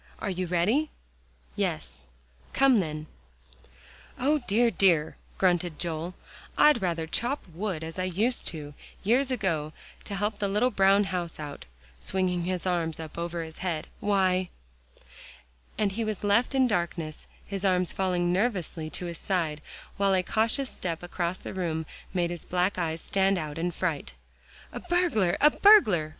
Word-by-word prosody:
"Are 200 - -3
you 185 0 -2
ready?" 210 - +2 0.7
Yes. 65 -1 -3 0.5
"Come 270 -4 +5
then." 155 -4 -3 1.1
"O, 295 +4 +2
dear, 230 +3 +3
dear!" 170 -8 +3 0.2
grunted 175 -3 +1
Joel, 170 +1 -3 0.4
"I'd 300 -6 +6
rather 170 -3 -1
chop 240 - -2
wood 180 -2 -3
as 165 +3 -6
I 185 - 0
used 210 +8 0
to, 150 -3 -5 0.3
years 250 +6 +3
ago, 165 - -1 0.3
to 200 - -4
help 205 +1 -1
the 205 - 0
little 210 +6 +2
brown 195 0 +4
house 180 -5 -4
out," 145 -2 -7 0.3
swinging 180 - 0
his 185 0 -2
arms 170 -3 -1
up 160 -1 -8
over 170 0 -3
his 160 -1 -10
head. 170 -4 -2
"Why" 185 -3 +2 1.3
And 205 -2 +1
he 225 +4 -2
was 215 -2 -3
left 230 +6 +2
in 265 -1 +5
darkness, 170 -6 -2 0.2
his 200 -1 -5
arms 185 -2 +2
falling 180 -2 +1
nervously 180 -6 -1
to 180 - -6
his 170 -1 -5
side, 165 -6 -1 0.4
while 195 -1 +3
a 185 - +2
cautious 230 +7 0
step 170 -2 -4
across 175 0 -2
the - - -8
room 165 -4 -2 0.3
made 175 -2 0
his 175 -2 -6
black 180 +2 0
eyes 165 -1 -2
stand 195 0 +2
out 155 -2 -4
in 175 +2 0
fright. 165 -3 -2 0.6
"A - - -4
burglar 350 - +1
a 300 +1 +6
burglar!" 215 - +6
185 Hz, 155 wpm, -28 LUFS, 170-205 Hz, 1.3 s, I'd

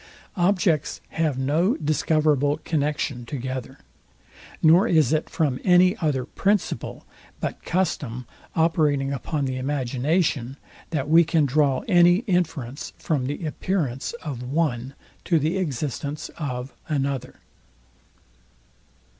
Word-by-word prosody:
Objects 180 -4 +1
have 155 -5 0
no 155 - +1
discoverable 150 -1 +2
connexion 145 -5 -1
together; 130 0 -5 0.9
nor 170 +7 +6
is 155 - +3
it 155 - 0
from 145 -7 0
any 180 0 +5
other 145 -7 0
principle 200 +7 -1 0.3
but - - -4
custom 140 -9 -1 0.3
operating 150 -4 +2
upon 145 +1 -2
the 130 -1 -2
imagination, 135 +1 0 0.3
that 145 -5 -2
we 165 +2 +6
can 160 -2 +2
draw 140 -1 +2
any 175 +1 +5
inference 160 - -2
from 140 -5 -1
the 145 +4 -4
appearance 150 - -2
of 140 -6 -5
one 130 -1 -1 0.3
to 170 - +2
the 160 +5 0
existence 145 -1 -3
of 130 -4 -4 0.2
another. 140 -3 -2
150 Hz, 110 wpm, -24 LUFS, 135-165 Hz, 0.9 s, nor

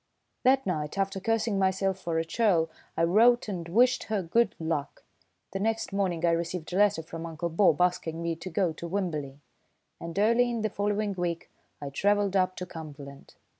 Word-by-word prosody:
That 265 +1 +3
night, 155 -2 -2
after 195 0 -1
cursing 220 0 0
myself 190 0 +1
for 170 -3 -2
a 165 - 0
churl, 165 -4 +2 0.3
I - - +2
wrote 225 +8 +4
and 175 -5 -5
wished 245 +7 +3
her 210 -3 -1
good 230 +8 +2
luck. 160 -3 -3 0.5
The 195 - -3
next 225 0 -1
morning 180 -4 0
I 170 - +4
received 170 0 -3
a - - 0
letter 205 -5 +3
from 165 0 -7
Uncle 170 +1 -4
Bob 165 -2 +3
asking 170 -2 0
me 170 0 -2
to 170 +3 -7
go 175 -1 0
to 170 +2 -7
Wimberley; 155 -7 -3 0.6
and 170 +2 -7
early 235 +4 +4
in 230 -2 -2
the 215 - 0
following 205 0 -1
week 175 -2 -3 0.3
I 140 -1 -6
travelled 205 +4 +1
up 185 -1 +2
to 180 - -5
Cumberland. 145 -5 -10
185 Hz, 185 wpm, -28 LUFS, 165-205 Hz, 0.6 s, wrote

